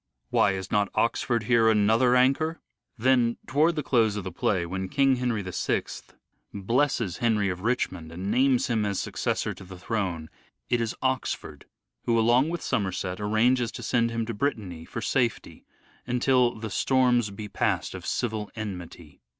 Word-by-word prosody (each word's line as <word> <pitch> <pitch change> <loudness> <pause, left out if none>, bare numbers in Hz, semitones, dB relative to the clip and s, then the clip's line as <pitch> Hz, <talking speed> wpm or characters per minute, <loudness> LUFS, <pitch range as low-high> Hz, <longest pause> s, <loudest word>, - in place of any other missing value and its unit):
' - - -55
' - - -48
Why, 100 - +3
is 95 0 -6
not 105 -1 +2
Oxford 115 0 +1
here 115 -1 +4
another 110 +4 +4
anchor? 140 +6 +2
' - - -61
' - - -48
Then 120 -3 +3
towards 155 +5 +2
the 150 - -2
close 115 -6 +2
of 105 - -4
the 95 - -5
play, 85 +1 0
when 95 +2 -4
King 135 +1 +3
Henry 120 -4 -1
VI 90 -1 -1 0.7
blesses 115 -1 0
Henry 110 -4 +1
of 90 -1 -4
Richmond 95 -8 -2
and 95 +4 -4
names 130 +2 +3
him 115 -5 0
as 100 -2 -1
successor - - -2
to - - -12
the 95 0 -11
throne, 90 -6 -3 0.4
it 120 -1 +2
is 115 -1 -2
Oxford 130 -1 -2 0.4
who, 115 -1 +2
along 120 +6 +4
with 175 0 -4
Somerset, 95 -2 -2
arranges 115 +3 +2
to - - -7
send 115 -1 +1
him 115 -1 -2
to 115 - -4
Brittany 100 - -3
for 115 - -6
safety, 120 -3 -1 0.4
until 125 0 +2
" - - -11
the 110 -1 -5
storms 125 -2 +2
be 105 +1 -7
passed 100 - -1
of - - -8
civil 110 -3 -2
enmity." 90 -7 -8
115 Hz, 180 wpm, -26 LUFS, 100-125 Hz, 0.7 s, here